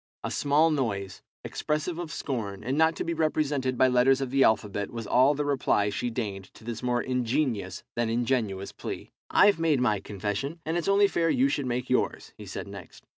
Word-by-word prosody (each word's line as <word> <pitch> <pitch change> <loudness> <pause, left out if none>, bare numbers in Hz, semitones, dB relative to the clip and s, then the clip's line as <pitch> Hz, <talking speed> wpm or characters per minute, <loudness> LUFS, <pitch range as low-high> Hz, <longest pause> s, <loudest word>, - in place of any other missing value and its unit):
A - - -3
small 150 +3 +3
noise, 100 -10 -2 0.2
expressive 155 +3 -2
of 170 -3 -5
scorn, 110 -9 -4
and 130 +4 -1
not 160 +1 +3
to - - -3
be 170 - -2
represented 145 -5 0
by 130 - +5
letters 130 +1 +4
of 135 -2 -3
the 135 0 +4
alphabet, 105 -2 +1
was 115 -2 -6
all 130 +7 +4
the 145 +1 -1
reply 125 -7 +1
she 120 +4 -2
deigned 100 -4 -4
to - - -15
this 115 0 -5
more 125 -1 0
ingenious 125 -6 -1
than 120 -1 0
ingenuous 115 -5 -1
plea. - - -7 0.2
"I've 200 -4 +5
made 160 -4 +2
my 115 -5 +2
confession, 105 - -4
and 160 +1 -1
it's 175 +1 -1
only 200 +1 +5
fair 170 -4 +1
you 265 +7 +3
should 140 - -1
make 125 +1 -2
yours," 125 - -1
he - - -11
said - - -6
next. - - -11
130 Hz, 200 wpm, -27 LUFS, 110-150 Hz, 0.2 s, by